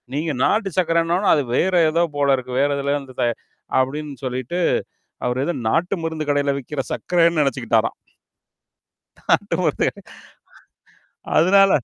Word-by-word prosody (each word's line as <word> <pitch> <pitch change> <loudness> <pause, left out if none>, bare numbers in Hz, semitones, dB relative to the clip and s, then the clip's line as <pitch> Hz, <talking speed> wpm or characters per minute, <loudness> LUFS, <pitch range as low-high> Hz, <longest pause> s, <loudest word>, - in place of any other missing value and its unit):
நீங்க 155 +2 -1
நாட்டு 210 -2 +2
சர்க்கரன்னோனா, 170 +2 +1
அது 145 - +1
வேற 185 +6 +1 0.2
ஏதோ 170 +2 +2
போலருக்கு. 135 -3 +1
வேற 145 - +2
எதுலயோ 140 +1 0
இருந்து 130 -2 -13
தயா-அப்பிடின்னு 135 +4 -2
சொல்லிட்டு 130 +7 -3 0.7
அவர் 125 +2 -1
எத 175 - -1 0.2
நாட்டு 175 - +1
மருந்து 160 -2 -3
கடையில 145 -1 +1
விக்கிற 135 +2 -4
சர்க்கரன்னு 170 -2 +2
நெனச்சுக்கிட்டாராம். 115 -5 0 1.2
நாட்டு - - +1
மருந்து - - +1
கட - - -13 1.4
அதுனால 195 +4 +5
145 Hz, 120 wpm, -21 LUFS, 130-170 Hz, 1.4 s, அதுனால